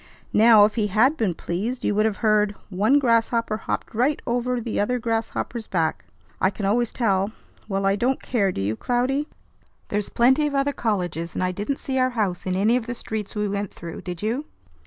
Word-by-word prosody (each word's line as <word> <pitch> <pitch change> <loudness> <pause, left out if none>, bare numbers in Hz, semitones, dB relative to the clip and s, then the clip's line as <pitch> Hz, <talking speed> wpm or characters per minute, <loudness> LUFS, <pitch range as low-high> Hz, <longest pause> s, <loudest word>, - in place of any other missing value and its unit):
Now, 220 -1 +7
if 210 - -1
he 215 -3 0
had 225 +9 +3
been 205 - 0
pleased, 215 +12 -3
you - - +2
would 215 +2 +3
have 210 - -3
heard 210 -1 +3 0.2
'One 210 +9 +3
grasshopper 230 -3 +2
hopped - - -4
right 255 +6 +1
over 245 +1 0
th' 230 -1 -4
other 250 +5 +1
grasshopper's 225 0 -3
back.' 165 -4 -1 0.4
I 190 - +4
can 200 0 -5
always 230 +4 +1
tell. 200 -3 0 0.4
Well, 195 0 -1
I 195 0 +3
don't 255 +5 +1
care; 200 -6 0
do 95 - -4
you, 105 +3 -1
Cloudy? 255 - 0 0.6
There's 210 0 -1
plenty 265 +5 +3
of 285 - -3
other 275 +1 +1
colleges, 175 -8 -2
and - - -1
I 185 - +1
didn't 205 +9 -3
see 265 -1 -2
our 255 0 +3
house 190 -4 -1
in 185 - 0
any 215 +6 +3
of 240 -2 -5
the 245 - -3
streets 220 -3 -5
we 210 0 0
went 200 0 -3
through, 170 -1 -8
did 180 0 -6
you?" 240 +7 -1
220 Hz, 205 wpm, -24 LUFS, 195-245 Hz, 0.6 s, Now